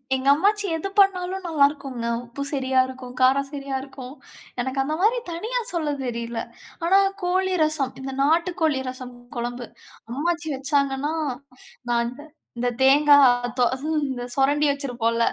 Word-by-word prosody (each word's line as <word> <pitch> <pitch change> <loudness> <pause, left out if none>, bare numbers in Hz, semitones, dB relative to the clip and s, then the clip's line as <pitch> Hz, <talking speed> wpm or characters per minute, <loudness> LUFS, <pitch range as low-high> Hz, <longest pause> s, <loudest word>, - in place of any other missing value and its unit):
எங்க 265 +1 -3
அம்மாச்சி 410 +7 +2
எது 325 +5 -3
பண்ணாலும் 380 -1 +2
நல்லா 305 -4 +4
இருக்குங்க. 270 -5 -6 0.2
உப்பு 240 +4 -8
சரியா 265 -2 +1
இருக்கும். 255 -1 -9
காரம் 270 +2 +4
சரியா 275 -2 -5
இருக்கும். 265 -1 -10 0.5
எனக்கு 260 +2 -3
அந்த 305 +3 -2
மாரி 445 +5 +3
தனியா 445 +9 -2
சொல்லத் 295 -5 -2
தெரியல. 235 -1 -4 0.5
ஆனா 380 +3 +5 0.3
கோழி 370 +1 +1
ரசம் 300 -4 0
இந்த 270 0 -5
நாட்டு 330 +5 +2
கோழி 295 -4 +2
ரசம் 255 -1 -8 0.2
குழம்பு 240 +1 -4 0.5
அம்மாச்சி 335 +4 -1
வச்சாங்கன்னா, 280 +1 0 0.8
நான் 235 0 +1 0.5
இந்த 245 +1 0
தேங்காய் 270 -4 +5
தோ 245 - +5 0.4
இந்த 250 -2 -4
சுரண்டி 290 +2 +3
வச்சிருப்போம்ல. 235 -5 -1
275 Hz, 135 wpm, -24 LUFS, 255-320 Hz, 0.8 s, ஆனா